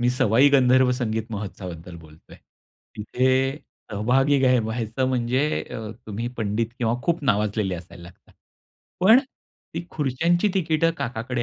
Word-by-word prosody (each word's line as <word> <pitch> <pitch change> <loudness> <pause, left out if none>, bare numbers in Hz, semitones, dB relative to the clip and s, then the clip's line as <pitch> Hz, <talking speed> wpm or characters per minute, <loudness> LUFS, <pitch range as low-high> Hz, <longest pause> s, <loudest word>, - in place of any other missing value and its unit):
मी 120 - +2
सवाई 125 +2 +4
गंधर्व 130 -1 +4
संगीत 110 -3 -2
महोत्सवाबद्दल 90 -4 -7
बोलतोय. 80 -1 -16 0.6
तिथे 130 +5 +1 0.3
सहभागी 130 +7 +2
घ्या 130 -2 +3
व्हायचं 115 +3 -2
म्हणजे 130 +4 0
अ, 110 -1 -6 0.2
तुम्ही 110 +3 -4
पंडित 110 +1 -1
किंवा 115 -1 +1
खूप 170 -2 0
नावाजलेले 105 -4 0
असायला 85 0 -11
लागतात. 85 - -16 0.7
पण 220 +7 +7 0.6
ती 170 +1 -4
खुर्च्यांची 160 +7 +1
तिकीटं 165 -3 +2
काकाकडे 120 +1 -3
125 Hz, 125 wpm, -23 LUFS, 105-135 Hz, 0.7 s, पण